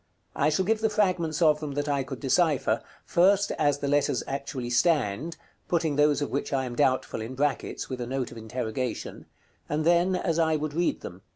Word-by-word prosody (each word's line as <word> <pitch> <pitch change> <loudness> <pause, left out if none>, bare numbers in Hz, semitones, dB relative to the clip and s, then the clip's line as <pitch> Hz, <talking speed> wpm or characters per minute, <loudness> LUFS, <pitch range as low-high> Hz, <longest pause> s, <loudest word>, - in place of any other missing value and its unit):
I - - +2
shall 170 +5 +1
give 220 +2 +1
the 220 - +2
fragments 180 -6 +1
of 150 -1 +4
them 150 -2 -5
that 145 +1 -2
I 140 -1 +1
could 130 -1 -6
decipher; 150 +1 +2 0.2
first 195 +3 +3
as 145 -2 +3
the 140 - -3
letters 145 0 +1
actually 135 -3 -4
stand 150 - +1 0.3
(putting 160 -4 0
those 150 0 +3
of - - -4
which 140 - -2
I 135 -1 0
am 120 -1 -5
doubtful 130 -4 +1
in 115 +4 -6
brackets, 145 +1 -1
with 130 -2 -5
a 120 - -3
note 130 -1 -3
of 120 - -10
interrogation), 115 +2 -4 0.4
and 155 +1 -1
then 175 +2 +3
as 170 -2 0
I 160 -1 +3
would 155 -1 -3
read 170 +2 0
them. 90 +2 -9
145 Hz, 200 wpm, -27 LUFS, 130-165 Hz, 0.4 s, of